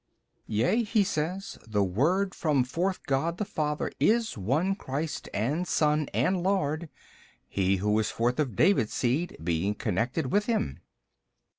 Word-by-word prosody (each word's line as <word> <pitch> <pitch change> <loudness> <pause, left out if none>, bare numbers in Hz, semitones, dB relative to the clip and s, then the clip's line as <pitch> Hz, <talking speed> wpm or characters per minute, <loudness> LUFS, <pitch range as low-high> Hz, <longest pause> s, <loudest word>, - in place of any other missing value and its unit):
B. - - -4
Yea, 125 - +3
he 215 -1 +2
says, 185 +3 -3
the 105 -2 +1
Word 165 - +1
from 150 -6 +2
forth 175 +9 -2
God 160 +5 0
the 210 - -2
Father 150 -4 -2
is 230 0 +2
One 140 - +1
Christ 150 -4 -4
and 145 - -1
Son 150 -2 +2
and 185 -1 +1
Lord, 170 -4 0 0.6
he 95 0 +1
who 105 +3 +1
is 110 - 0
forth 120 +3 0
of 130 -9 0
David's 125 - +3
seed 135 +8 0
being 85 +5 0
connected 120 - -1
with 210 +1 +2
Him. 90 - -1
150 Hz, 150 wpm, -28 LUFS, 110-185 Hz, 0.6 s, Yea